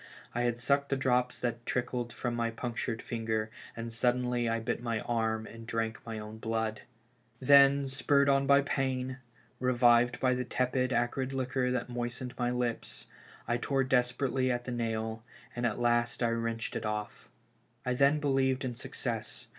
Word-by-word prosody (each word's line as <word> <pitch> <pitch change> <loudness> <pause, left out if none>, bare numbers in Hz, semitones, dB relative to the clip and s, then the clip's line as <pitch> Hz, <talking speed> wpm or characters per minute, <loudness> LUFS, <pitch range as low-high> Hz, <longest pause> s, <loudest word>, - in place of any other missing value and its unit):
I 120 - 0
had 120 -1 0
sucked 140 +3 +1
the 135 - +1
drops 125 -2 +1
that 120 -1 -2
trickled 120 -1 -2
from 120 0 -3
my 120 0 0
punctured 115 0 -3
finger, 110 -2 -2 0.3
and 115 0 -5
suddenly 125 0 +1
I 115 0 0
bit 120 +1 -2
my 115 -2 -1
arm 110 -2 -1
and 115 0 -10
drank 115 -1 -2
my 115 -1 -5
own 105 +1 -8
blood! 110 -1 -2 0.6
Then 140 +1 +6
spurred 140 +1 +2
on 135 0 +3
by 140 0 +6
pain, 130 -2 -1 0.4
revived 120 -1 +4
by 130 -1 +3
the 125 0 -1
tepid, 125 +1 0
acrid 130 +2 0
liquor 130 -1 0
that 125 -1 -1
moistened 120 +1 -4
my 120 -1 0
lips, 125 -1 -2 0.4
I 120 +1 +1
tore 135 +2 +1
desperately 130 0 +1
at 120 0 -2
the 125 - -4
nail, 115 -1 -2 0.3
and 120 0 +1
at 110 - -2
last 120 0 +1
I 120 - +3
wrenched 115 -1 -2
it - - -2
off 105 -1 -4 0.6
I 125 - 0
I - - +2
then 140 +4 +4
believed 135 -2 +1
in 125 - -2
success. - - -5
120 Hz, 170 wpm, -31 LUFS, 115-130 Hz, 0.6 s, Then